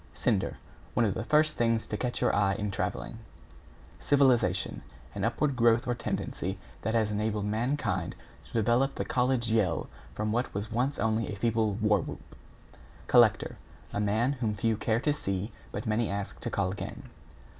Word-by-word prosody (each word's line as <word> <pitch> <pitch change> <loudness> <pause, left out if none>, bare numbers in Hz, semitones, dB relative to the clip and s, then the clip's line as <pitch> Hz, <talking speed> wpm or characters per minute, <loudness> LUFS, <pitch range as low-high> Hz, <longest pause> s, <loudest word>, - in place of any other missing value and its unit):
=CINDER= - - 0 0.4
One 120 - +4
of 100 - +1
the 110 - -3
first 155 +4 +3
things 115 -1 +2
to - - -4
catch 120 +3 -2
your - - +3
eye 100 -1 +3
in 105 0 -2
travelling. 105 +3 -3 0.8
=CIVILIZATION= 120 -10 +2 0.3
An - - -4
upward 145 -3 +1
growth 115 -1 +4
or 120 - +2
tendency 95 -5 -3 0.2
that 110 +3 -1
has 110 -2 +2
enabled 105 0 -1
mankind 110 - -1 0.3
to - - -17
develop 120 +5 +2
the - - -2
college 125 -2 +1
yell 105 -6 +1 0.3
from 105 0 -1
what 120 +3 0
was 105 +2 -3
once 130 +5 0
only 110 0 0
a - - -4
feeble 110 -1 +1
war 105 -1 +3
whoop. - - -9 0.7
=COLLECTOR= - - +4 0.4
A - - -1
man 110 +5 +2
whom 110 -3 0
few 110 +2 +1
care 110 +1 0
to 145 +3 +1
see 100 -6 -3 0.2
but 105 - -5
many 110 +1 +1
ask 100 0 -4
to - - -3
call 95 -2 0
again. 100 - -6
110 Hz, 170 wpm, -29 LUFS, 105-120 Hz, 0.8 s, One